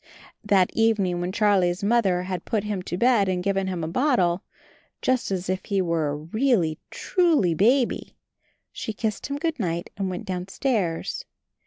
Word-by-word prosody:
That 195 -3 +3
evening 200 -6 +2
when 180 +1 -2
Charlie's 195 -3 +2
Mother 200 -5 +2
had 185 -2 -4
put 215 -4 -1
him 210 -3 -3
to 175 -1 -4
bed 230 -3 +3
and 180 -1 -1
given 195 -1 0
him 180 -3 -3
a - - -2
bottle, 185 - +2 0.6
just 255 -1 +1
as 190 -1 -2
if 185 0 -2
he 200 -2 0
were 165 -4 0
a 145 - -2
really 170 - 0
truly 320 - +2
baby, 240 - +1 0.5
she 220 - -5
kissed 215 0 -3
him 280 +1 -3
good 315 -1 -2
night 170 -4 -2
and 195 -1 -1
went 185 +4 -5
downstairs. 185 0 -2
195 Hz, 165 wpm, -25 LUFS, 180-225 Hz, 0.6 s, That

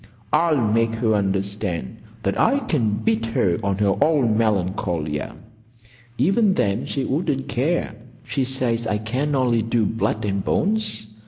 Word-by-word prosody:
I'll 165 -3 +3
make 115 -1 +1
her 110 -1 +1
understand 100 -1 -2 0.3
that 100 - -1
I 265 +5 +4
can 150 - 0
beat 110 +1 +1
her 95 -6 +1
on 100 -1 0
her 100 -1 +2
own 145 -8 +2
Melancolia. 90 -8 -1 0.8
Even 195 - +3
then 100 +4 0
she 135 - -2
wouldn't 140 -2 -1
care. 140 +1 -1 0.3
She 135 - -1
says 125 -3 -1
I 105 - 0
can 130 +7 -1
only 125 -3 +2
do 115 0 +1
blood 110 0 -1
and 100 -1 -1
bones. 215 - 0
115 Hz, 145 wpm, -22 LUFS, 100-135 Hz, 0.8 s, I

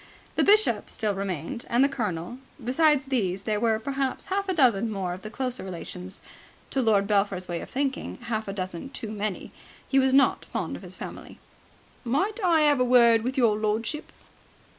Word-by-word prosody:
The - - +2
Bishop 425 +1 +3
still 215 -2 -1
remained, 195 +1 -4
and 240 +3 +4
the - - +5
Colonel. 220 -4 -4 0.3
Besides 290 +2 +3
these, 200 -8 -1
there 210 -1 0
were 225 -1 +2
perhaps 270 +3 -2
half 395 0 -1
a - - +2
dozen 230 -7 +4
more 190 -4 -3
of 185 - -8
the 215 - -7
closer 255 +1 -3
relations: 185 +1 -7 0.5
to 270 - +1
Lord 210 -4 +3
Belpher's 200 -3 0
way 170 -1 -3
of - - -9
thinking, 275 0 -2
half 220 -2 -3
a - - -2
dozen 185 +4 -5
too 225 -5 -6
many. 210 -2 -4 0.4
He 270 - +3
was 265 0 +3
not 275 +1 +4
fond - - -4
of - - -9
his - - -6
family. - - -9 0.7
"Might 380 - -1
I 335 -3 +4
have 295 -3 +4
a - - +4
word 235 -2 +5
with 255 +4 -3
your 230 -5 +4
lordship?" 220 +7 -2
230 Hz, 185 wpm, -26 LUFS, 200-270 Hz, 0.7 s, the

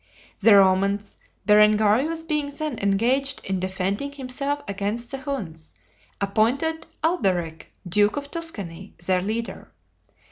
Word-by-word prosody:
The 210 0 +7
Romans, 195 +1 +3 0.3
Berengarius 215 +9 +4
being 300 -3 -1
then 290 -2 -4
engaged 245 +8 +1
in 190 -1 -1
defending 190 +8 -2
himself 280 +1 -3
against 205 +4 -3
the 270 - -4
Huns, 195 - -6 0.4
appointed 250 +11 0 0.2
Alberic, 180 - 0 0.2
duke 205 +7 +3
of 285 0 -5
Tuscany, 200 - -5
their 185 -1 +2
leader. 220 +4 -4
215 Hz, 110 wpm, -24 LUFS, 195-280 Hz, 0.4 s, The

